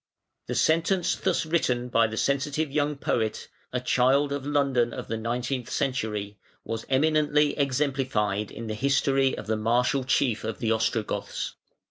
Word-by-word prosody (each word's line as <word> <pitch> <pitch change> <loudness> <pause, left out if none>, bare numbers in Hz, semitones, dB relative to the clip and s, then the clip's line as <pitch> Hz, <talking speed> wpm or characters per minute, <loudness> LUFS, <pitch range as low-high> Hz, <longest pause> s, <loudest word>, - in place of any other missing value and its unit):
The - - -3
sentence 165 +3 +2
thus 185 -3 0
written 125 -7 0
by 115 -2 +3
the 110 0 -6
sensitive 140 +3 0
young 145 0 0
poet, 110 -5 -1 0.2
a 125 - -1
child 130 +3 +2
of 140 -1 -3
London 135 -5 +1
of - - -6
the 115 - -1
nineteenth 120 +3 -3
century, 105 -6 -2 0.2
was 115 0 -5
eminently 150 +1 +3
exemplified 130 -7 0
in 115 - -8
the 110 - -3
history 135 +3 +2
of - - -6
the 110 +1 0
martial 125 +5 +1
chief 125 -3 +1
of 110 -1 -3
the 115 -2 -1
Ostrogoths. 110 -1 -1
130 Hz, 150 wpm, -26 LUFS, 115-145 Hz, 0.2 s, by